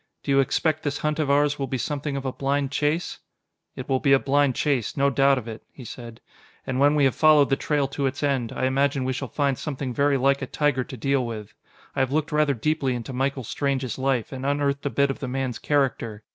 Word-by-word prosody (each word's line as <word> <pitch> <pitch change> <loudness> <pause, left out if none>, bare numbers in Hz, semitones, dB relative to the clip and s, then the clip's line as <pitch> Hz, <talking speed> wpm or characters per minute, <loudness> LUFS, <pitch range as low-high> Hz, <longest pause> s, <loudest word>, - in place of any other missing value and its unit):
"Do 140 - -2
you 135 - +4
expect 155 +3 +1
this 145 0 -2
hunt 150 0 -2
of 150 -3 0
ours 145 +1 +2
will 135 - -2
be 130 - -2
something 140 +3 -3
of 135 - -5
a 130 - -2
blind 140 0 -1
chase?" 150 +4 -1 0.6
"It 130 - -7
will 130 -1 +1
be 135 0 +3
a - - +7
blind 140 -1 +2
chase, 140 -6 -1
no 140 0 +3
doubt 135 0 +4
of 120 -3 -5
it," 110 -1 -7
he 130 - -12
said. 115 -1 -9 0.5
"And 130 0 -2
when 145 +2 +4
we 145 - +3
have 135 - +3
followed 150 -3 +5
the - - +5
trail 145 -1 0
to 140 0 -1
its 140 +2 -4
end, 135 -5 0
I - - -2
imagine 135 +1 +1
we 130 - 0
shall 135 +1 -4
find 140 0 -1
something 135 -4 -4
very 140 +1 +2
like 140 +1 +2
a 135 - -3
tiger 145 -3 0
to 130 - -9
deal 135 +2 +1
with. 110 -3 -6 0.4
I - - -1
have 130 -1 +1
looked 155 +2 0
rather 150 -2 +2
deeply 135 0 0
into 120 +2 -6
Michael 135 +1 -1
Strange's 130 0 -2
life, 130 -4 0
and 130 0 -6
unearthed 140 0 0
a - - 0
bit 140 0 +1
of - - -7
the 135 - -4
man's 130 -2 -3
character. 120 -7 -1
135 Hz, 240 wpm, -24 LUFS, 130-145 Hz, 0.6 s, a